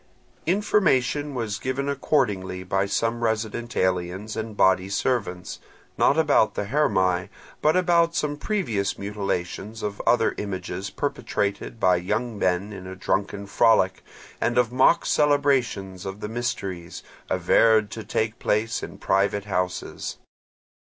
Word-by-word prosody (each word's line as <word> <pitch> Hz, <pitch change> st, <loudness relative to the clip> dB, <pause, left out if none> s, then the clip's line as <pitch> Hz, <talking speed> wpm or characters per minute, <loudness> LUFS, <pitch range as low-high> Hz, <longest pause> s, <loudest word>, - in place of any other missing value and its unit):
Information 150 Hz, -7 st, +2 dB
was 110 Hz, -3 st, -2 dB
given 130 Hz, +2 st, -2 dB
accordingly 105 Hz, -10 st, 0 dB
by 95 Hz, +2 st, 0 dB
some 115 Hz, +3 st, -1 dB
resident 115 Hz, +1 st, -2 dB
aliens 95 Hz, +3 st, -1 dB
and 110 Hz, -1 st, -5 dB
body 95 Hz, 0 st, +3 dB
servants, 100 Hz, -5 st, -2 dB, 0.4 s
not 140 Hz, -, +3 dB
about 145 Hz, -8 st, +3 dB
the -, -, -1 dB
Hermae 95 Hz, -8 st, +1 dB, 0.3 s
but 155 Hz, +4 st, +3 dB
about 170 Hz, -2 st, +3 dB
some 145 Hz, -1 st, 0 dB
previous 125 Hz, -, -1 dB
mutilations 100 Hz, +1 st, -4 dB
of 100 Hz, -1 st, -3 dB
other -, -, +4 dB
images 95 Hz, -1 st, -4 dB
perpetrated 100 Hz, +4 st, -3 dB
by 90 Hz, -3 st, +4 dB
young 105 Hz, +5 st, -2 dB
men 95 Hz, +3 st, 0 dB
in 95 Hz, -2 st, -8 dB
a 95 Hz, -, -7 dB
drunken 100 Hz, +2 st, -2 dB
frolic, 100 Hz, -3 st, +3 dB, 0.4 s
and 120 Hz, -, +1 dB
of 120 Hz, -2 st, +3 dB
mock 130 Hz, +6 st, +4 dB
celebrations 135 Hz, -11 st, +1 dB
of 95 Hz, +1 st, -6 dB
the 105 Hz, -, -4 dB
mysteries, 100 Hz, -7 st, -4 dB, 0.3 s
averred 110 Hz, -2 st, +3 dB
to 110 Hz, -, -6 dB
take 110 Hz, +1 st, -2 dB
place 110 Hz, +3 st, 0 dB
in -, -, -8 dB
private 100 Hz, +1 st, +1 dB
houses. 90 Hz, -3 st, -3 dB
105 Hz, 130 wpm, -25 LUFS, 95-125 Hz, 0.4 s, other